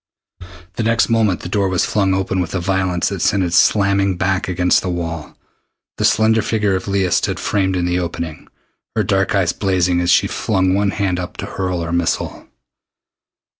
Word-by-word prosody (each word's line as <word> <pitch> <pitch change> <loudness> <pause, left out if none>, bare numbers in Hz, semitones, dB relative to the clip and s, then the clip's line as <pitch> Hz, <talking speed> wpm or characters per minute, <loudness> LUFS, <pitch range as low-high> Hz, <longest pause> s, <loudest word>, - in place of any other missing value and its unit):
The - - 0
next 115 +1 +2
moment 110 -6 +2
the - - -6
door 100 +1 0
was 95 -2 +1
flung 95 -2 +1
open 95 0 -1
with 90 +1 -3
a - - 0
violence 95 -1 0
that - - -5
sent 95 - +2
it 85 -1 -2
slamming 100 0 +3
back 95 +1 0
against 90 -1 +2
the 95 - -3
wall. 85 -3 -5 0.6
The - - 0
slender 110 +1 +3
figure 105 -2 0
of 95 - -4
Leah 95 -2 0
stood - - 0
framed 95 -2 0
in 90 -1 0
the 90 +1 0
opening, 85 -2 -5 0.5
her - - +1
dark 95 0 0
eyes 90 -4 +1
blazing 90 -3 +1
as 85 - 0
she - - +4
flung 95 -3 0
one 100 +1 +1
hand 95 -2 -1
up 90 - -6
to - - -5
hurl 90 -2 -3
her 85 - -4
missile. 85 0 -2
95 Hz, 190 wpm, -18 LUFS, 90-100 Hz, 0.6 s, she